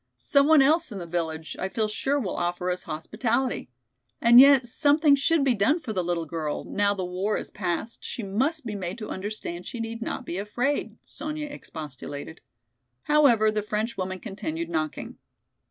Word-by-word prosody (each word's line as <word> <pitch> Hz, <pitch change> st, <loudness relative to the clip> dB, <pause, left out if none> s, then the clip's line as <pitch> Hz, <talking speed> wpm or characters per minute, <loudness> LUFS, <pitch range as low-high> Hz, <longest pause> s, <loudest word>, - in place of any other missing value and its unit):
Some 280 Hz, 0 st, +3 dB
one 315 Hz, -3 st, +7 dB
else 310 Hz, +1 st, +3 dB
in 205 Hz, -, -6 dB
the 175 Hz, -, -6 dB
village 160 Hz, -2 st, -3 dB
I 190 Hz, -, -2 dB
feel 220 Hz, +2 st, 0 dB
sure 270 Hz, +7 st, -1 dB
will 205 Hz, -9 st, -3 dB
offer 175 Hz, +1 st, -1 dB
us 180 Hz, -, -3 dB
hospitality. 225 Hz, -, -1 dB, 0.5 s
And 235 Hz, +1 st, +8 dB
yet 275 Hz, -2 st, +8 dB
something 290 Hz, +4 st, +5 dB
should 295 Hz, +2 st, +2 dB
be 265 Hz, -2 st, +3 dB
done 235 Hz, -, +2 dB
for 230 Hz, -9 st, -5 dB
the 185 Hz, -3 st, -1 dB
little 170 Hz, -1 st, -1 dB
girl, 155 Hz, -2 st, -3 dB
now 205 Hz, 0 st, 0 dB
the 185 Hz, -2 st, -3 dB
war 185 Hz, +4 st, -1 dB
is -, -, -7 dB
past 185 Hz, +4 st, -3 dB
she 235 Hz, -, -5 dB
must 265 Hz, +10 st, -1 dB
be 220 Hz, -, -4 dB
made 185 Hz, -2 st, -4 dB
to 215 Hz, -2 st, -7 dB
understand 190 Hz, -3 st, -5 dB
she 240 Hz, -, -6 dB
need 230 Hz, 0 st, -5 dB
not 245 Hz, +2 st, -4 dB
be 180 Hz, -, -4 dB
afraid," 245 Hz, +8 st, -2 dB
Sonya 305 Hz, -1 st, -5 dB
expostulated. 150 Hz, -, -8 dB, 0.6 s
However, 250 Hz, -8 st, +4 dB
the 215 Hz, 0 st, -1 dB
French 210 Hz, +2 st, -2 dB
woman 185 Hz, 0 st, -3 dB
continued 170 Hz, -6 st, -5 dB
knocking. 155 Hz, -2 st, -3 dB
215 Hz, 180 wpm, -26 LUFS, 180-270 Hz, 0.6 s, And